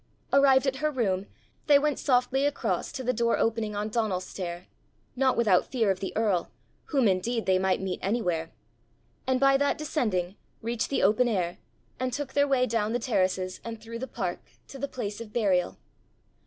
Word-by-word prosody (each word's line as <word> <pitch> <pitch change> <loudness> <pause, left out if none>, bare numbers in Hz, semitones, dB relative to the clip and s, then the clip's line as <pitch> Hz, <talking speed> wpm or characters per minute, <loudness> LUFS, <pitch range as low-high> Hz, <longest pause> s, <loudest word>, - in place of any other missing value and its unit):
Arrived 275 -1 +5
at 265 -1 0
her 305 +2 0
room, 200 -9 -1 0.4
they 290 -1 +7
went 295 0 0
softly 255 0 +2
across 290 0 -1
to 260 - -5
the 250 +1 +1
door 235 0 +1
opening 225 -2 0
on 205 +1 -2
Donal's 215 -5 -1
stair 175 -1 -6 0.5
not 260 0 +2
without 205 -6 +3
fear 225 -6 +1
of 190 - -2
the 190 - -4
earl, 205 -6 +1 0.4
whom 270 -6 +2
indeed 215 +5 0
they 185 -1 +3
might 190 0 +1
meet 190 -1 -3
anywhere 180 -6 -1 0.8
and 260 -1 +2
by 275 0 +5
that 285 +1 +1
descending, 210 - -1 0.2
reached 230 0 -2
the 275 - 0
open 215 +5 +4
air, 180 -6 -1 0.4
and 255 -1 -2
took 280 0 -4
their 285 0 +3
way 265 -2 +3
down 225 -2 -1
the - - +2
terraces 190 -5 -1
and 230 -1 -6
through 230 +1 -8
the 260 - -4
park 185 -8 -3 0.3
to 275 - -10
the 280 - -2
place 215 -5 -5
of 220 -2 -9
burial. 190 -6 +1
230 Hz, 185 wpm, -27 LUFS, 190-260 Hz, 0.8 s, they